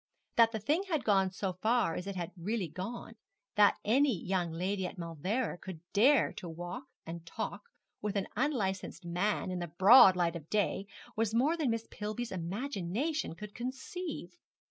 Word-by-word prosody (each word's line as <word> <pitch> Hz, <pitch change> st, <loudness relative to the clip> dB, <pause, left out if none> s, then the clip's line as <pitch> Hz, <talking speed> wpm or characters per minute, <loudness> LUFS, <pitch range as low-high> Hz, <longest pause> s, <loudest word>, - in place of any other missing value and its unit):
That 230 Hz, -1 st, +6 dB
the 220 Hz, -, -2 dB
thing 295 Hz, -, +1 dB
had 315 Hz, -5 st, 0 dB
gone 195 Hz, -3 st, +3 dB
so 190 Hz, 0 st, -3 dB
far 230 Hz, -6 st, +2 dB
as 180 Hz, +4 st, -5 dB
it 200 Hz, -1 st, -4 dB, 0.2 s
really 195 Hz, +3 st, -2 dB
had 155 Hz, -, -11 dB
gone, 225 Hz, +5 st, -6 dB, 0.4 s
that 205 Hz, -1 st, +5 dB
any 250 Hz, -1 st, +3 dB
young 180 Hz, -2 st, -1 dB
lady 185 Hz, +3 st, -1 dB
at -, -, -9 dB
Mauleverer 175 Hz, -, -2 dB
could 185 Hz, -4 st, -8 dB
dare 260 Hz, +8 st, +5 dB
to 180 Hz, -, -6 dB
walk 175 Hz, -, -6 dB, 0.2 s
and 165 Hz, 0 st, -6 dB
talk -, -, -5 dB, 0.4 s
with 210 Hz, -1 st, -2 dB
an 195 Hz, -1 st, 0 dB
unlicensed 200 Hz, -, -1 dB
man 185 Hz, +3 st, 0 dB
in 180 Hz, -, -2 dB
the 175 Hz, -, -3 dB
broad 190 Hz, +4 st, +8 dB
light 175 Hz, -1 st, +1 dB
of 160 Hz, -2 st, -8 dB
day, 200 Hz, -1 st, 0 dB, 0.3 s
was 225 Hz, 0 st, 0 dB
more 280 Hz, +8 st, +3 dB
than 310 Hz, -6 st, 0 dB
Miss 230 Hz, 0 st, -1 dB
Pillby's 215 Hz, +3 st, -4 dB
imagination 200 Hz, -, -2 dB
could 210 Hz, +3 st, -9 dB
conceive. 260 Hz, -, -5 dB
200 Hz, 170 wpm, -32 LUFS, 180-240 Hz, 0.4 s, broad